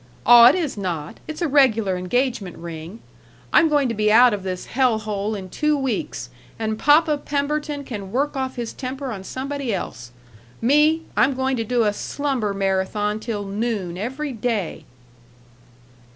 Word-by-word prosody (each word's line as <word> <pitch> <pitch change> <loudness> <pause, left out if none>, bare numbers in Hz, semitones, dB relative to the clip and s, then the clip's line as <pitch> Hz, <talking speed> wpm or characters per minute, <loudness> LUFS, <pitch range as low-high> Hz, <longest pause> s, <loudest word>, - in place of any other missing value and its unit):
Aw, 240 0 +9
it 260 - +6
is 320 - -2
not; 170 -6 -4
it's 310 +3 -4
a - - +2
regular 230 -9 +3
engagement 205 +1 -1
ring. 170 +5 -8 0.5
I'm 325 - +6
going 290 -3 +2
to 235 - -2
be 210 -1 +1
out 240 +1 +7
of 205 - -3
this 185 -1 -5
hell 250 -3 +2
hole 215 0 -3
in 190 -2 -6
two 300 - 0
weeks, 220 - -3 0.3
and 220 -1 -2
Papa 300 0 +4
Pemberton 290 0 -2
can 205 -7 -7
work 280 +5 0
off 260 -1 -3
his 240 -2 -5
temper 265 0 -5
on 195 -4 -6
somebody 270 +4 -4
else. 125 - -5 0.5
Me, 300 +6 +3
I'm 270 +1 +3
going 265 0 0
to 230 - -1
do 240 +1 +1
a 210 -1 +1
slumber 265 -3 -2
marathon 195 +2 -1
till 215 -2 -4
noon 200 -3 -3
every 265 +9 -4
day." 225 -7 -3
235 Hz, 165 wpm, -22 LUFS, 200-275 Hz, 0.5 s, Aw